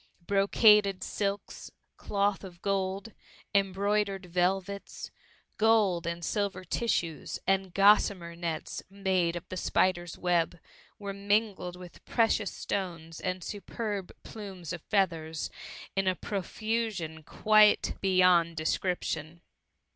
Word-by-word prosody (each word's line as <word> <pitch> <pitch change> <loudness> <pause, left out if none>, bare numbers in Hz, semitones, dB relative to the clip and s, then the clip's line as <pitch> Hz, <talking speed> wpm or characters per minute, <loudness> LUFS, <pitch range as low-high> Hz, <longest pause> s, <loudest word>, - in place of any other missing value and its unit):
358 - - -11
THE - - +2 0.5
MUMMY. - - 0
Brocaded 185 - -10
silks, 200 -1 -3 0.3
cloth 200 0 0
of 180 -3 -10
gold, 195 +2 -1 0.4
embroidered 200 0 +1
velvets, 185 +3 -2 0.5
gold 210 -6 +3
and 170 0 -3
silver 200 -2 -1
tissues, 170 - -1
and 195 -1 +1
gossamer 195 -3 +4
nets 170 -2 -4
made 190 -3 0
of 175 +2 -6
the 185 - -5
spider's 175 -2 +1
web, 175 -1 +1 0.4
were 200 -2 -5
mingled 200 -2 0
with 180 -1 -12
precious 225 -3 +2
stones 165 -4 -4
and 185 -1 -3
superb 205 -1 -4
plumes 190 -6 -7
of 175 - -6
feathers 165 -6 -1 0.4
in 195 -1 +1
a 185 - +3
profusion 200 -4 -3
quite 215 +6 +4
beyond 180 -3 +4
description. 160 -1 -2
190 Hz, 115 wpm, -29 LUFS, 175-200 Hz, 0.5 s, gossamer